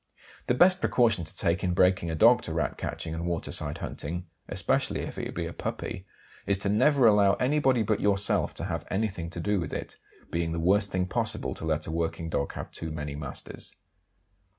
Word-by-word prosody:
The 125 Hz, -, +2 dB
best 185 Hz, +6 st, +5 dB
precaution 110 Hz, -8 st, +2 dB
to 80 Hz, -, -11 dB
take 85 Hz, -2 st, 0 dB
in 90 Hz, -1 st, 0 dB
breaking 90 Hz, -2 st, +3 dB
a 80 Hz, -, -2 dB
dog 120 Hz, +7 st, +6 dB
to 80 Hz, -, -5 dB
Rat 85 Hz, -, -1 dB
catching 80 Hz, -, -5 dB
and 85 Hz, +1 st, -3 dB
waterside 80 Hz, -3 st, -2 dB
hunting 85 Hz, +4 st, -5 dB, 0.2 s
(especially -, -, 0 dB
if -, -, -6 dB
it -, -, -5 dB
be -, -, -2 dB
a -, -, -5 dB
puppy) 95 Hz, +1 st, -5 dB, 0.4 s
is 100 Hz, -, +2 dB
to -, -, +2 dB
never 135 Hz, +5 st, +4 dB
allow 105 Hz, -3 st, +6 dB
anybody 130 Hz, -3 st, +2 dB
but 110 Hz, 0 st, 0 dB
yourself 100 Hz, -1 st, +2 dB
to -, -, -5 dB
have 85 Hz, -2 st, -3 dB
anything 95 Hz, -5 st, -2 dB
to 85 Hz, -, -7 dB
do 105 Hz, +3 st, +1 dB
with 85 Hz, -4 st, -4 dB
it, -, -, -5 dB, 0.2 s
it -, -, -27 dB
being 85 Hz, -1 st, -1 dB
the 85 Hz, -, -2 dB
worst 100 Hz, +4 st, +3 dB
thing 90 Hz, -1 st, 0 dB
possible 90 Hz, -, -1 dB
to -, -, -7 dB
let 80 Hz, -1 st, 0 dB
a -, -, -5 dB
working 80 Hz, 0 st, -2 dB
dog 70 Hz, -3 st, -1 dB
have -, -, -7 dB
too 80 Hz, -, -6 dB
many 75 Hz, -2 st, -5 dB
masters. 70 Hz, -2 st, -7 dB
90 Hz, 205 wpm, -28 LUFS, 80-105 Hz, 0.4 s, dog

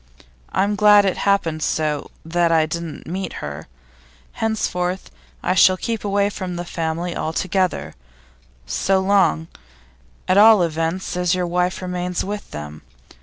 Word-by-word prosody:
I'm 205 Hz, +1 st, +1 dB
glad 205 Hz, -1 st, +6 dB
it 190 Hz, -, +1 dB
happened 165 Hz, -6 st, +1 dB
so 155 Hz, -2 st, -1 dB, 0.2 s
that 170 Hz, +1 st, +1 dB
I 160 Hz, -1 st, +4 dB
didn't 165 Hz, -1 st, -6 dB
meet 185 Hz, +4 st, -4 dB
her. 70 Hz, 0 st, -7 dB, 0.6 s
Henceforth 185 Hz, -4 st, -2 dB, 0.3 s
I -, -, +1 dB
shall 185 Hz, 0 st, +5 dB
keep 225 Hz, +2 st, -3 dB
away 200 Hz, 0 st, +1 dB
from 185 Hz, -3 st, -5 dB
the 175 Hz, 0 st, -4 dB
family 170 Hz, 0 st, -3 dB
altogether, 165 Hz, -, -1 dB, 0.7 s
so 190 Hz, -, +1 dB
long, 190 Hz, -5 st, +2 dB, 0.8 s
at 185 Hz, +2 st, +4 dB
all 215 Hz, -3 st, +7 dB
events, 165 Hz, +3 st, -2 dB
as 180 Hz, 0 st, +1 dB
your 180 Hz, -1 st, -1 dB
wife 180 Hz, +2 st, -1 dB
remains 180 Hz, -1 st, -2 dB
with 205 Hz, +1 st, -5 dB
them. 75 Hz, 0 st, -8 dB
180 Hz, 135 wpm, -21 LUFS, 165-195 Hz, 0.8 s, all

